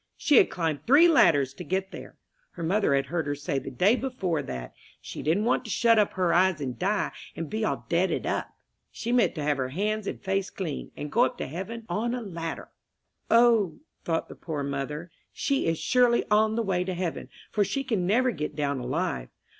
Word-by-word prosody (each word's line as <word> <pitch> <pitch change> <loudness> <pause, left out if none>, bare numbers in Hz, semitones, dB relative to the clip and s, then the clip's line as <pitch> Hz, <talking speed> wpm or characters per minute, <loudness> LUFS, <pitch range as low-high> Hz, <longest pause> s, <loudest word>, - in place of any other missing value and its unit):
She 290 - +4
had - - +6
climbed 160 -5 -2
three 290 +7 +7
ladders 155 - +4
to 180 - -8
get 190 +2 -2
there. - - -10 0.4
Her 170 - -7
mother 185 -3 +2
had 135 0 +1
heard 160 +1 -2
her 145 - -1
say 140 -1 -2
the - - -7
day 180 - +3
before 195 - -2
that 65 - -7 0.3
"she - - -8
didn't 170 +9 +1
want 250 - +2
to - - -7
shut 230 +1 +4
up 210 - +2
her 180 -2 +1
eyes 185 -1 +3
and 130 -5 -4
die, - - 0 0.2
and 165 - -4
be 220 +1 -1
all - - -2
deaded 175 +2 +1
up - - -2 0.4
she 235 - -4
meant 245 -1 +3
to 155 - -3
have 145 -1 +1
her 130 -1 -2
hands 210 +7 -2
and - - -4
face 195 0 -1
clean, 165 -7 -5
and 150 0 -5
go 235 - +4
up 250 - -4
to - - -3
heaven 195 - -6
on 225 +7 -1
a 250 - -4
ladder." 165 -5 -6 0.6
"O," 230 -7 +4 0.3
thought 165 -1 -1
the - - -9
poor 155 -4 -5
mother, 140 +4 -4 0.2
"she 275 - 0
is 165 0 +1
surely 245 +2 +3
on 215 +1 +4
the 230 - 0
way 185 -3 0
to 185 0 -3
heaven, 175 -2 -4 0.2
for 210 - +2
she 275 +7 -2
can 215 -9 -1
never 250 +6 +3
get 150 -7 -4
down 140 -2 -1
alive. 125 - -2
180 Hz, 215 wpm, -27 LUFS, 150-220 Hz, 0.6 s, three